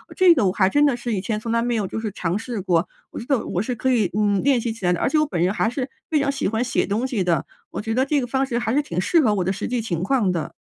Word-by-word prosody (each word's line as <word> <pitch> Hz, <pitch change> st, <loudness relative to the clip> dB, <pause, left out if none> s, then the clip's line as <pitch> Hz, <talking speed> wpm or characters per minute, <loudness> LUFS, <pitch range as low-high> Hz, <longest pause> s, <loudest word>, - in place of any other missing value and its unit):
这 370 Hz, -2 st, +6 dB
个 255 Hz, -10 st, +1 dB
我 185 Hz, -, 0 dB
还 190 Hz, -1 st, +3 dB
真 290 Hz, +7 st, +3 dB
的 280 Hz, -4 st, +2 dB
是 240 Hz, -1 st, -4 dB
以 200 Hz, -, 0 dB
前 210 Hz, +3 st, -2 dB
从 225 Hz, +2 st, -4 dB
来 230 Hz, 0 st, +2 dB
没 240 Hz, 0 st, 0 dB
有 215 Hz, -3 st, 0 dB
就 190 Hz, -, -4 dB
是 220 Hz, -1 st, -3 dB
尝 180 Hz, 0 st, -2 dB
试 225 Hz, -2 st, -5 dB
过， 180 Hz, -2 st, +1 dB, 0.2 s
我 -, -, -6 dB
觉 -, -, -7 dB
得 270 Hz, -5 st, +1 dB
我 180 Hz, -, -2 dB
是 245 Hz, +4 st, -3 dB
可 260 Hz, +4 st, 0 dB
以， 220 Hz, -7 st, +2 dB
嗯， 205 Hz, -2 st, +2 dB
练 270 Hz, -3 st, +2 dB
习 230 Hz, -, -2 dB
起 220 Hz, -4 st, -6 dB
来 180 Hz, -, +3 dB
的。 175 Hz, -, -3 dB
而 -, -, +2 dB
且 310 Hz, -, +2 dB
我 305 Hz, -, +3 dB
本 180 Hz, -, -3 dB
人 185 Hz, +2 st, +1 dB
还 220 Hz, -, +1 dB
是 255 Hz, +2 st, -4 dB, 0.2 s
非 305 Hz, -2 st, +2 dB
常 280 Hz, 0 st, +1 dB
喜 275 Hz, -, -2 dB
欢 220 Hz, +4 st, 0 dB
写 250 Hz, -, 0 dB
东 215 Hz, +5 st, -1 dB
西 230 Hz, -8 st, -1 dB
的， 170 Hz, -5 st, +1 dB, 0.3 s
我 -, -, -4 dB
觉 225 Hz, +1 st, -3 dB
得 260 Hz, +3 st, +2 dB
这 285 Hz, 0 st, +1 dB
个 -, -, -2 dB
方 265 Hz, +2 st, 0 dB
式 245 Hz, -3 st, -2 dB
还 240 Hz, -1 st, -1 dB
是 290 Hz, -, +3 dB
挺 180 Hz, -, -4 dB
适 335 Hz, -, +3 dB
合 235 Hz, -9 st, +3 dB
我 190 Hz, -, 0 dB
的 185 Hz, -, 0 dB
实 195 Hz, -, -4 dB
际 245 Hz, -1 st, -1 dB
情 175 Hz, -7 st, -3 dB
况 210 Hz, -1 st, +1 dB
的。 170 Hz, -4 st, -3 dB
225 Hz, 365 characters per minute, -22 LUFS, 190-260 Hz, 0.3 s, 这